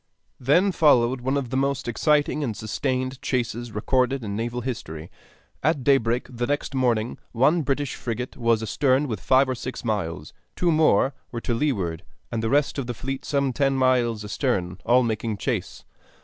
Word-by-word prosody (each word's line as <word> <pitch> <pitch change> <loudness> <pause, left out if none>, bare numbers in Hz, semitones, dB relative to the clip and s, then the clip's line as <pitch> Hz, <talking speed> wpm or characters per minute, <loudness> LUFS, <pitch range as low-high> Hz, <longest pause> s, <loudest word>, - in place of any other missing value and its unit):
Then 170 +10 +3
followed 130 -7 +3
one 130 +3 0
of 130 -4 -3
the - - -2
most 140 0 0
exciting 150 +4 +1
and 115 -6 -3
sustained 130 +3 -2
chases 120 -3 -2
recorded 125 +4 0
in 100 -2 -4
naval 120 +2 -3
history. 85 -11 -6 0.5
At 150 -2 +1
daybreak 125 -3 +2
the 120 -1 -3
next 145 0 -2
morning 120 -3 0
one 145 +8 +3
British 140 0 -1
frigate 125 +1 -4
was 115 -2 +1
astern 135 +4 +2
within 110 -6 -4
five 130 +1 +4
or 130 - 0
six 125 0 -6
miles, 85 -9 -3 0.2
two 175 -1 +2
more 155 -5 +3 0.2
were 115 - -4
to 120 - -1
leeward, 100 - -1 0.3
and 115 -1 -1
the 110 - -1
rest 145 +2 +2
of 130 - -4
the 120 - -3
fleet 135 +2 -4
some 140 -3 0
ten 135 +1 +1
miles 125 -4 +2
astern, 95 - -1
all 125 +1 +5
making 110 -1 -2
chase. - - -3
125 Hz, 175 wpm, -24 LUFS, 115-135 Hz, 0.5 s, all